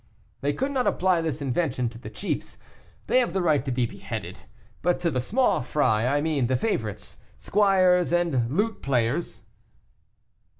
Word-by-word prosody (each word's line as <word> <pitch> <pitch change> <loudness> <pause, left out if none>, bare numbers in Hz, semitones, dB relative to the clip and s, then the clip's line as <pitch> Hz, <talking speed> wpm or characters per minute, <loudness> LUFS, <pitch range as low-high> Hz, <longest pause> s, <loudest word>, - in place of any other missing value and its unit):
"They 140 +1 +1
could 270 - -2
not 260 -3 0
apply 185 -2 +2
this 160 -2 -3
invention 130 -2 0
to 115 0 -12
the - - -8
chiefs; - - -4 0.5
they 255 - +3
have 240 -9 0
the 190 - 0
right 150 -6 +2
to 135 - -3
be 125 -1 +1
beheaded; 85 - -7 0.4
but 175 +2 +1
to 170 -2 +1
the 130 -2 0
small 245 - +1
fry, 120 -4 +1
I 145 +2 +2
mean 150 -5 0
the 130 0 +1
favorites, 110 - -3 0.2
squires, 185 -4 +3
and 165 -9 +1
lute 210 - -1
players." 130 +4 -1
155 Hz, 165 wpm, -25 LUFS, 125-185 Hz, 0.5 s, they